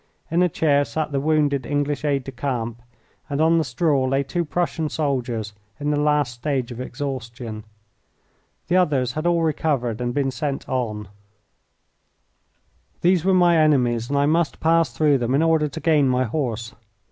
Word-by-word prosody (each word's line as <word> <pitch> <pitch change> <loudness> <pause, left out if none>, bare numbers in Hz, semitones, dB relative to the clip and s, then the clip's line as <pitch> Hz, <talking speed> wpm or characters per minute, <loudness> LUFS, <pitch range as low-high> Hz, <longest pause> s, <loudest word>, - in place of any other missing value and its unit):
In 170 +2 +2
a 180 - +3
chair 145 -3 +2
sat 150 +1 -3
the 140 - 0
wounded 145 -2 +1
English 145 +1 -1
aide 140 -3 0
de 135 - -7
camp, 120 -3 -3 0.5
and 140 0 -2
on 165 +1 +4
the - - +1
straw 140 +1 +1
lay 135 +2 +1
two 170 +5 -2
Prussian 165 -1 -2
soldiers 125 -8 -2 0.3
in 145 0 -1
the 145 - +1
last 150 -4 +1
stage 130 0 -2
of 120 +1 -6
exhaustion. 120 -5 -6 1.0
The 175 - +2
others 140 -9 +2
had 155 +5 -2
all 170 -1 +2
recovered 135 -7 -1
and 120 0 -1
been 135 +1 0
sent 135 +2 -4
on. 110 -5 -3 1.9
These 180 -1 +3
were 190 0 +3
my 175 -2 +5
enemies, 125 -7 +2
and 140 - 0
I 140 - +3
must 160 +2 +1
pass 165 -3 +2
through 145 +3 +2
them 120 +2 0
in 150 - +3
order 160 -2 +3
to 155 +3 -7
gain 150 -5 +3
my 125 0 +2
horse. 120 -2 -3
140 Hz, 170 wpm, -22 LUFS, 125-155 Hz, 1.9 s, my